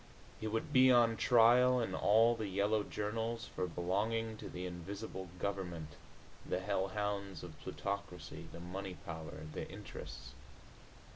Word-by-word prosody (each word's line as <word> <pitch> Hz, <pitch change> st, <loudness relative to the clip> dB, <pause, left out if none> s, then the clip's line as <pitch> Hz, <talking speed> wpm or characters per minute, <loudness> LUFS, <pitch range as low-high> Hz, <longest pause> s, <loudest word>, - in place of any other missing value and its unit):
He 110 Hz, -, -3 dB
would 115 Hz, +6 st, -2 dB
be 130 Hz, 0 st, +8 dB
on 120 Hz, -2 st, +5 dB
trial 125 Hz, +3 st, +6 dB
in 115 Hz, -, -1 dB
all 115 Hz, +3 st, +5 dB
the 110 Hz, -2 st, -3 dB
yellow 100 Hz, +3 st, +2 dB
journals 115 Hz, +3 st, -2 dB
for 90 Hz, -, 0 dB
belonging 105 Hz, +6 st, 0 dB
to -, -, -7 dB
the 90 Hz, +1 st, -5 dB
Invisible 95 Hz, +2 st, -6 dB
Government, 90 Hz, -5 st, -3 dB, 0.5 s
the -, -, -1 dB
Hell 95 Hz, 0 st, 0 dB
Hounds 100 Hz, -3 st, -2 dB
of 80 Hz, -4 st, -9 dB
Plutocracy, 100 Hz, -2 st, -5 dB
the -, -, -8 dB
Money 90 Hz, +2 st, -5 dB
Power, 80 Hz, -2 st, -6 dB
the -, -, -4 dB
Interests. -, -, -8 dB
100 Hz, 140 wpm, -36 LUFS, 90-115 Hz, 0.5 s, be